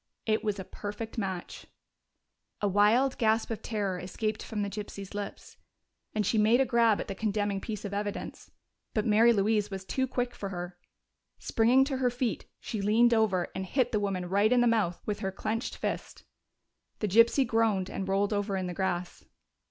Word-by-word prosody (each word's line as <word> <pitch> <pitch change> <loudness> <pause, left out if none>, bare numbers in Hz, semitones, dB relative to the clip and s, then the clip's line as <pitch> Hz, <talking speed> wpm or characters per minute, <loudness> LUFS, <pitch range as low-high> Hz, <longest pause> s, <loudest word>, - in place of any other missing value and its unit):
It 215 -1 +1
was 210 -2 -1
a 190 - -5
perfect 210 +4 -6
match! 190 -4 -5 0.9
A 205 - +1
wild 215 +7 +3
gasp 225 0 +2
of 220 -1 -4
terror 200 -5 -2
escaped 215 +4 -3
from 210 -2 -3
the - - -1
gypsy's 200 -1 -7
lips, 205 0 -7 0.6
and 210 -1 +1
she 220 - +2
made 220 +4 +5
a 270 - +4
grab 230 -3 +3
at - - -4
the 195 - -3
condemning 205 -1 -1
piece 210 -2 -5
of 200 - -5
evidence. 205 0 -4 0.5
But 215 - +1
Mary 225 +2 +5
Louise 210 -1 +2
was 190 -1 -6
too 260 +7 -1
quick 245 -1 -2
for 200 - -5
her. 175 -1 -6 0.6
Springing 240 +4 +3
to 270 -1 -2
her 255 -1 +2
feet, 245 -1 -2
she 215 - -4
leaned 230 +4 +4
over 205 -6 +2
and 190 - -3
hit 245 +6 0
the 215 - +1
woman 195 -3 -2
right 200 +4 +3
in 250 -1 +5
the - - +4
mouth 215 -7 +1
with 210 -1 -2
her 195 -2 -2
clenched 220 +5 -3
fist. - - -4 0.7
The 210 - -1
gypsy 230 +7 +5
groaned 225 -5 +1
and 190 - -4
rolled 200 +2 +1
over 205 -1 -1
in 185 - -2
the 180 - -4
grass. 180 -1 -3
210 Hz, 190 wpm, -29 LUFS, 195-230 Hz, 0.9 s, made